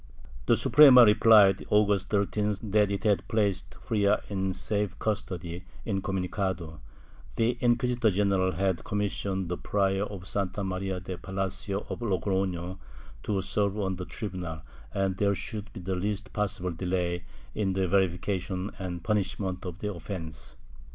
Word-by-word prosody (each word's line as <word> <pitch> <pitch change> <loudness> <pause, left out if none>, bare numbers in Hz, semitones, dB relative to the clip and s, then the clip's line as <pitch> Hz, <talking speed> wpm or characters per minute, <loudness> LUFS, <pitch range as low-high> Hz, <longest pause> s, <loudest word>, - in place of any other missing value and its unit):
The - - +5
Suprema 135 -5 +8
replied, 105 -3 +6
August 100 -2 +3
13th, 105 0 -1
that 105 -1 +4
it 100 +1 -3
had 105 -3 +1
placed 100 -6 0
Frias 105 -2 +2
in 95 -1 -1
safe 100 0 0
custody, 90 -5 -3 0.2
incomunicado; 95 -4 -2 0.6
the 115 +2 +2
inquisitor 120 -1 +2
general 95 -1 +1
had 95 0 0
commissioned 100 -2 -2
the 90 +1 -3
Prior 95 -1 +1
of 95 -3 -8
Santa 100 0 -1
Maria 95 0 -2
de 90 0 -7
Palacio 95 +1 -3
of - - -5
Logrofio 95 -4 -1 0.4
to 100 -2 -1
serve 100 0 0
on 95 -3 -1
the 90 - -5
tribunal, 90 -8 -5 0.3
and 95 -1 -1
there 100 0 +2
should 105 +1 -4
be 110 - -8
the 95 +1 -3
least 105 +3 -3
possible 95 -3 -1
delay 90 0 -2 0.3
in 95 -3 0
the 95 0 0
verification 95 +1 0
and 90 -3 -5
punishment 95 -2 -1
of 90 -1 -6
the 105 +1 -3
offence. 85 -2 -7
95 Hz, 140 wpm, -28 LUFS, 90-105 Hz, 0.6 s, Suprema